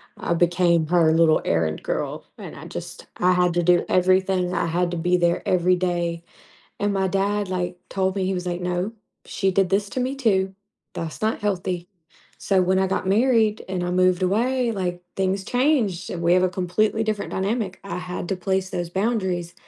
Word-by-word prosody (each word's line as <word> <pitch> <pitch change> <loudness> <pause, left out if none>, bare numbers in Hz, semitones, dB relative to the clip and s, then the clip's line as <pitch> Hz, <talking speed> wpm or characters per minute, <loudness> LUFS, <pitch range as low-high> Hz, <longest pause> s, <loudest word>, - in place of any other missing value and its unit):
I 170 - -1
became 170 -1 +3
her 170 -2 +4
little 160 -1 +4
errand 80 -2 0
girl, - - -3
and - - -9
I - - -10
just - - -8
I 180 +1 +3
had 180 -1 +2
to 175 - +2
do 175 0 +4
everything. 185 0 +2
I 170 - 0
had 175 +1 0
to 175 - -3
be 180 +2 +2
there 175 0 +1
every 180 0 +3
day. 175 -2 -2 0.6
And 205 0 +1
my 190 -1 +1
dad, 200 +1 0
like, 180 -1 -3
told 190 0 -1
me, 190 - 0
he 190 - 0
was 180 0 -4
like, 175 0 -2
"No, 180 +4 -2 0.3
she 190 -1 -1
did 195 -1 +2
this 200 +1 +1
to 255 - -3
me 260 +2 -2
too. 195 -6 +1 0.4
That's 165 +4 -6
not 220 +1 +1
healthy." 180 -3 -2 0.5
So, 190 -2 +2
when 190 +1 +2
I 190 - +2
got 190 - -1
married 220 0 +2
and 185 -2 -2
I 175 - -2
moved 185 0 +2
away, 240 +6 +1
like, 180 -4 -3
things 190 0 0
changed 245 - +1
and 170 -1 -5
we 170 +1 +4
have 185 0 +4
a - - +3
completely 190 +4 0
different 215 -2 -2
dynamic. 195 0 -2
I 195 -2 -5
had 180 -1 -5
to 195 - -1
place 190 +1 -1
those 175 -1 -3
boundaries 190 -4 -1
185 Hz, 200 wpm, -23 LUFS, 175-195 Hz, 0.6 s, her